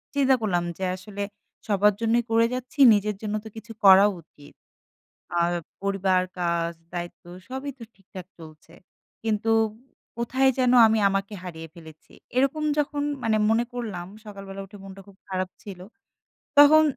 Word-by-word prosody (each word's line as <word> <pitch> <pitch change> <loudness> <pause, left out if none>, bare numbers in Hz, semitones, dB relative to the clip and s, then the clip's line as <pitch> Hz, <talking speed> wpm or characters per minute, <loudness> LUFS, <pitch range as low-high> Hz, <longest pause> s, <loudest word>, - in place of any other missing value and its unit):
চিন্তা 270 -2 +4
করলাম 175 -5 0
যে 190 - -5
আসলে 200 +2 -7 0.4
সবার 205 0 +3
জন্যই 230 +1 +2
করে 230 0 +4
যাচ্ছি 255 +4 -7
নিজের 210 0 0
জন্য 215 0 -3
তো - - -9
কিছু 225 0 -10
করা 195 +1 +9 0.2
উচিত। 145 -2 -19 0.9
আর 170 0 +2 0.3
পরিবার 195 -2 +1 0.2
কাজ 170 -1 0 0.2
দায়িত্ব 175 0 -6 0.3
সবই 265 +2 -5
তো 235 - -10
ঠিকঠাক 190 -2 -11
চলছে। 160 0 -14 0.5
কিন্তু 225 0 0 0.7
কোথায় 260 +3 +2
যেন 250 -1 +3 0.2
আমি 220 0 +2
আমাকে 195 +1 -2
হারিয়ে 165 -3 -8
ফেলেছি 160 -2 -15 0.2
এরকম 275 +4 +1
যখন 290 0 -1 0.2
মানে 220 -2 +2
মনে 230 +2 +2
করলাম 210 -8 -5 0.2
সকালবেলা 195 -1 -8
উঠে 205 +1 -14
মনটা 195 0 -11
খুব 195 -1 -17
খারাপ 185 -1 -2
ছিল। 195 -3 -9 0.8
তখন 300 +2 +8
205 Hz, 145 wpm, -25 LUFS, 185-235 Hz, 0.9 s, করা